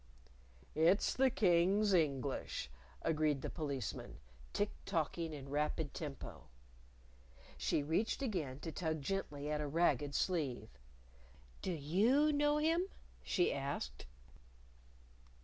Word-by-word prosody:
"It's 165 Hz, +6 st, +4 dB
the 265 Hz, 0 st, +4 dB
King's 195 Hz, 0 st, +3 dB
English," 140 Hz, -, 0 dB, 0.3 s
agreed 155 Hz, -3 st, +1 dB
the -, -, -3 dB
Policeman, 140 Hz, -, -4 dB, 0.3 s
tick 205 Hz, +1 st, 0 dB
tocking 165 Hz, -2 st, -1 dB
in 140 Hz, -3 st, -7 dB
rapid 150 Hz, +1 st, -1 dB
tempo. 145 Hz, -4 st, -7 dB, 1.1 s
She 145 Hz, -, 0 dB
reached 180 Hz, -, 0 dB
again 160 Hz, -, -2 dB
to 165 Hz, -, -4 dB
tug 160 Hz, -2 st, -2 dB
gently 150 Hz, -5 st, -2 dB
at 150 Hz, 0 st, 0 dB
a 150 Hz, -, -2 dB
ragged 145 Hz, -2 st, +2 dB
sleeve. 140 Hz, -, 0 dB, 0.9 s
"Do 190 Hz, -, -1 dB
you 215 Hz, -, +3 dB
know 295 Hz, +1 st, +3 dB
him?" 330 Hz, +4 st, +2 dB, 0.3 s
she 180 Hz, -, +2 dB
asked. 135 Hz, -, -4 dB
160 Hz, 110 wpm, -37 LUFS, 145-195 Hz, 1.1 s, It's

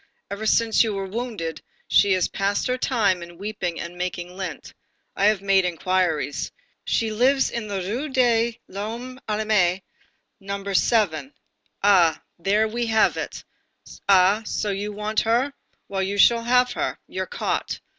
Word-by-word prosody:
Ever 210 Hz, +2 st, -3 dB
since 230 Hz, +1 st, +4 dB
you 220 Hz, -3 st, -2 dB
were 195 Hz, 0 st, -3 dB
wounded, 195 Hz, -6 st, -4 dB, 0.3 s
she 200 Hz, -1 st, +4 dB
has 185 Hz, -2 st, +2 dB
passed 200 Hz, +1 st, -1 dB
her 250 Hz, -, +1 dB
time 215 Hz, -9 st, +1 dB
in 170 Hz, 0 st, -10 dB
weeping 195 Hz, -3 st, -4 dB
and 170 Hz, +1 st, -6 dB
making 180 Hz, 0 st, -4 dB
lint. 190 Hz, -1 st, -6 dB, 0.4 s
I 200 Hz, -, +1 dB
have 210 Hz, -2 st, +3 dB
made 195 Hz, -1 st, +4 dB
inquiries. 175 Hz, -5 st, -1 dB, 0.3 s
She 225 Hz, -1 st, 0 dB
lives 260 Hz, +5 st, +2 dB
in 235 Hz, -3 st, -4 dB
the 200 Hz, -2 st, -3 dB
Rue 240 Hz, +11 st, -3 dB
de 235 Hz, -3 st, +2 dB
l'Homme 230 Hz, +6 st, -6 dB
Armé, 210 Hz, -4 st, +1 dB, 0.6 s
No. 200 Hz, 0 st, -5 dB
7. 175 Hz, -, +2 dB, 0.5 s
Ah! 180 Hz, -6 st, +5 dB, 0.2 s
There 205 Hz, +5 st, +2 dB
we 235 Hz, +2 st, -2 dB
have 220 Hz, -1 st, +3 dB
it! -, -, -5 dB, 0.7 s
Ah! 195 Hz, +2 st, +5 dB
so 210 Hz, -1 st, -2 dB
you 205 Hz, +2 st, -3 dB
want 210 Hz, +1 st, -1 dB
her! 240 Hz, +5 st, +1 dB, 0.3 s
Well, 195 Hz, -1 st, -2 dB
you 195 Hz, +2 st, -2 dB
shall 230 Hz, +3 st, +5 dB
have 250 Hz, +1 st, +3 dB
her. -, -, -2 dB
You're -, -, -4 dB
caught. 485 Hz, -1 st, -2 dB
205 Hz, 155 wpm, -23 LUFS, 185-230 Hz, 0.7 s, Ah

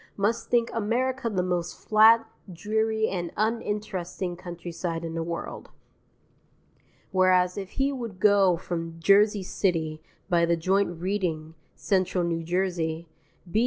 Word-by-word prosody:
must 220 Hz, +4 st, 0 dB
think 235 Hz, -1 st, +2 dB
America 240 Hz, +3 st, -1 dB
the 185 Hz, -4 st, 0 dB
most 175 Hz, -1 st, -2 dB
flat, 225 Hz, +1 st, +5 dB, 0.3 s
dreary, 220 Hz, +4 st, 0 dB
and 175 Hz, -3 st, -3 dB
uninteresting 205 Hz, -5 st, -2 dB
countryside 170 Hz, -1 st, -5 dB
in 165 Hz, -, -5 dB
the 165 Hz, -, -2 dB
world. 170 Hz, +1 st, -5 dB, 1.4 s
Whereas 185 Hz, -1 st, +3 dB
if 195 Hz, -1 st, -6 dB
he 275 Hz, +1 st, +1 dB
would 230 Hz, -8 st, -6 dB
go 200 Hz, -4 st, +4 dB
from 165 Hz, -1 st, -5 dB
Jersey 200 Hz, +3 st, +4 dB
City 160 Hz, -5 st, -1 dB, 0.3 s
by 175 Hz, -3 st, +2 dB
the 170 Hz, 0 st, +2 dB
joint 185 Hz, 0 st, 0 dB
Reading 170 Hz, -4 st, -2 dB, 0.2 s
Central 185 Hz, -2 st, 0 dB
New 170 Hz, -1 st, -1 dB
Jersey 170 Hz, -2 st, -2 dB, 0.4 s
B. 215 Hz, -, +2 dB
185 Hz, 125 wpm, -26 LUFS, 170-210 Hz, 1.4 s, flat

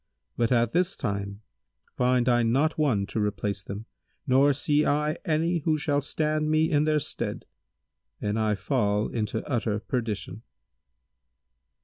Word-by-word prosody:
But 115 Hz, 0 st, 0 dB
at 120 Hz, -2 st, +3 dB
this 180 Hz, +2 st, +1 dB
time 100 Hz, 0 st, -3 dB, 0.5 s
find 125 Hz, 0 st, +2 dB
I 120 Hz, -1 st, +4 dB
not 135 Hz, +8 st, +2 dB
one 120 Hz, -10 st, +2 dB
to 110 Hz, -, -4 dB
replace 105 Hz, -1 st, -1 dB
them 100 Hz, +3 st, -7 dB, 0.4 s
nor 140 Hz, +1 st, +4 dB
see 145 Hz, +2 st, +1 dB
I 150 Hz, +2 st, +1 dB
any 165 Hz, +1 st, +1 dB
who 155 Hz, 0 st, +1 dB
shall 145 Hz, -1 st, 0 dB
stand 155 Hz, +1 st, -1 dB
me 155 Hz, +2 st, +2 dB
in 150 Hz, 0 st, +3 dB
their 155 Hz, 0 st, +2 dB
stead; -, -, -4 dB, 0.7 s
and 105 Hz, +1 st, -1 dB
I 110 Hz, -1 st, +1 dB
fall 105 Hz, -1 st, 0 dB
into 110 Hz, -3 st, -3 dB
utter 115 Hz, -5 st, 0 dB
perdition." 110 Hz, -3 st, -4 dB
125 Hz, 140 wpm, -27 LUFS, 105-150 Hz, 0.7 s, I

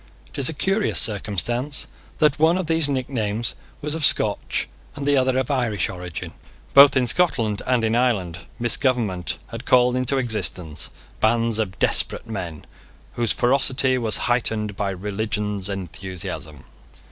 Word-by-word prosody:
It -, -, -8 dB
is 130 Hz, -, +2 dB
a -, -, -4 dB
curious 195 Hz, +7 st, +1 dB
circumstance 115 Hz, -, -1 dB, 0.3 s
that 150 Hz, -2 st, +2 dB
one 165 Hz, +3 st, +4 dB
of 185 Hz, -, -2 dB
these 160 Hz, -2 st, 0 dB
nicknames 120 Hz, -5 st, -1 dB, 0.3 s
was 150 Hz, 0 st, -3 dB
of 160 Hz, -1 st, -2 dB
Scotch, -, -, +1 dB, 0.3 s
and 145 Hz, -1 st, -5 dB
the 145 Hz, 0 st, +3 dB
other 130 Hz, -1 st, +2 dB
of 130 Hz, +1 st, 0 dB
Irish, 120 Hz, -7 st, 0 dB
origin. 90 Hz, -3 st, -7 dB, 0.4 s
Both 140 Hz, -1 st, +8 dB
in 130 Hz, -, +3 dB
Scotland 115 Hz, -, +1 dB
and 125 Hz, -2 st, +2 dB
in 110 Hz, 0 st, +1 dB
Ireland, 100 Hz, -9 st, 0 dB, 0.2 s
misgovernment 120 Hz, -, 0 dB
had 115 Hz, +3 st, -8 dB
called 125 Hz, 0 st, +4 dB
into 130 Hz, +2 st, +1 dB
existence 95 Hz, -, -2 dB, 0.3 s
bands 115 Hz, 0 st, +2 dB
of 100 Hz, -4 st, -2 dB
desperate -, -, +2 dB
men 90 Hz, -8 st, -6 dB, 0.5 s
whose 120 Hz, -2 st, 0 dB
ferocity 130 Hz, 0 st, +2 dB
was 110 Hz, -3 st, +2 dB
heightened 110 Hz, -4 st, 0 dB
by 100 Hz, 0 st, -1 dB
religions 105 Hz, +1 st, -3 dB
enthusiasm. 90 Hz, -6 st, -6 dB
115 Hz, 145 wpm, -22 LUFS, 100-130 Hz, 0.5 s, Both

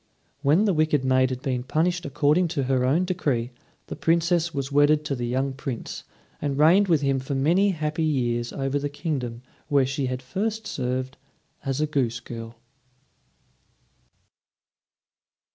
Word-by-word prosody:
When 150 Hz, +9 st, +4 dB
the 200 Hz, -, +3 dB
wicked 155 Hz, -4 st, +1 dB
maid 130 Hz, 0 st, +3 dB
had 130 Hz, 0 st, -5 dB
been 130 Hz, -4 st, -1 dB
punished 165 Hz, +6 st, 0 dB
according 150 Hz, +5 st, +2 dB
to 140 Hz, -, +2 dB
her 130 Hz, -1 st, +1 dB
own 155 Hz, +8 st, +2 dB
decree, 140 Hz, -10 st, -1 dB, 0.3 s
the -, -, -6 dB
Princess 170 Hz, +1 st, +1 dB
was 140 Hz, -2 st, -4 dB
wedded 145 Hz, +1 st, +4 dB
to 140 Hz, -, -1 dB
the 120 Hz, -1 st, -3 dB
young 130 Hz, +2 st, -1 dB
Prince, 130 Hz, -3 st, -6 dB, 0.4 s
and 140 Hz, -2 st, -1 dB
reigned 175 Hz, +7 st, +5 dB
with 165 Hz, -5 st, +3 dB
him 135 Hz, -1 st, +1 dB
for 135 Hz, +2 st, -4 dB
many 170 Hz, +9 st, +3 dB
happy 155 Hz, -3 st, -2 dB
years 120 Hz, -6 st, 0 dB
over 135 Hz, +1 st, -1 dB
the 145 Hz, 0 st, -2 dB
kingdom 130 Hz, -6 st, -4 dB, 0.2 s
where 140 Hz, -3 st, +3 dB
she 135 Hz, 0 st, -2 dB
had 130 Hz, 0 st, -4 dB
first 215 Hz, +10 st, -3 dB
served 130 Hz, -4 st, -3 dB, 0.5 s
as 135 Hz, -1 st, -2 dB
a -, -, +3 dB
goose 130 Hz, -6 st, -1 dB
girl. 115 Hz, -1 st, -8 dB
140 Hz, 155 wpm, -25 LUFS, 130-160 Hz, 0.5 s, reigned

